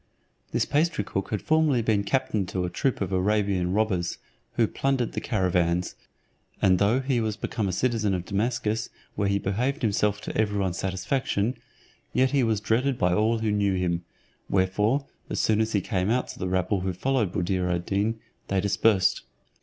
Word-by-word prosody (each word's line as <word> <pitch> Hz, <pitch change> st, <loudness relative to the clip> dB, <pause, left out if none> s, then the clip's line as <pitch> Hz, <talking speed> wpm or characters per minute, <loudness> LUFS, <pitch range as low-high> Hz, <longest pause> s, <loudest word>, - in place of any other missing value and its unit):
This -, -, +1 dB
pastry 165 Hz, +2 st, +1 dB
cook 95 Hz, -, -3 dB
had 105 Hz, -4 st, -2 dB
formerly 155 Hz, -6 st, +3 dB
been 105 Hz, -2 st, +2 dB
captain 105 Hz, -3 st, 0 dB
to 90 Hz, -1 st, -2 dB
a 90 Hz, -, -4 dB
troop 135 Hz, -5 st, -1 dB
of 95 Hz, -1 st, -1 dB
Arabian 95 Hz, -1 st, +1 dB
robbers, 95 Hz, -4 st, 0 dB, 0.4 s
who -, -, +3 dB
plundered 135 Hz, -4 st, 0 dB
the -, -, -4 dB
caravans; 90 Hz, -4 st, +1 dB, 0.7 s
and 95 Hz, -2 st, +4 dB
though 110 Hz, +6 st, +3 dB
he 130 Hz, -3 st, 0 dB
was 110 Hz, -1 st, -2 dB
become 110 Hz, -3 st, -2 dB
a -, -, 0 dB
citizen 110 Hz, 0 st, +1 dB
of 90 Hz, -1 st, -4 dB
Damascus, 110 Hz, +2 st, -1 dB, 0.2 s
where 100 Hz, -, 0 dB
he 100 Hz, 0 st, +2 dB
behaved 125 Hz, +9 st, -1 dB
himself 105 Hz, -1 st, +1 dB
to -, -, -6 dB
every 105 Hz, -2 st, +1 dB
one's 95 Hz, -2 st, -1 dB
satisfaction, 100 Hz, +4 st, -1 dB, 0.6 s
yet 130 Hz, +1 st, +3 dB
he 140 Hz, -, +3 dB
was 110 Hz, -4 st, +1 dB
dreaded 120 Hz, +5 st, +1 dB
by 90 Hz, -2 st, +2 dB
all 110 Hz, +4 st, +2 dB
who 110 Hz, -1 st, 0 dB
knew 100 Hz, -2 st, +1 dB
him; 85 Hz, -2 st, -1 dB, 0.5 s
wherefore, 105 Hz, +8 st, +1 dB, 0.2 s
as -, -, -2 dB
soon 110 Hz, 0 st, +3 dB
as 110 Hz, 0 st, -1 dB
he 100 Hz, -, +2 dB
came 95 Hz, -1 st, -1 dB
out 125 Hz, +2 st, +1 dB
to -, -, -9 dB
the 90 Hz, -, -2 dB
rabble 95 Hz, +1 st, 0 dB
who 95 Hz, 0 st, -1 dB
followed 120 Hz, -1 st, 0 dB
Buddir 90 Hz, 0 st, 0 dB
ad 90 Hz, 0 st, -1 dB
Deen, 105 Hz, +3 st, 0 dB, 0.3 s
they 95 Hz, -, +1 dB
dispersed. 100 Hz, 0 st, +2 dB
105 Hz, 185 wpm, -26 LUFS, 95-115 Hz, 0.7 s, and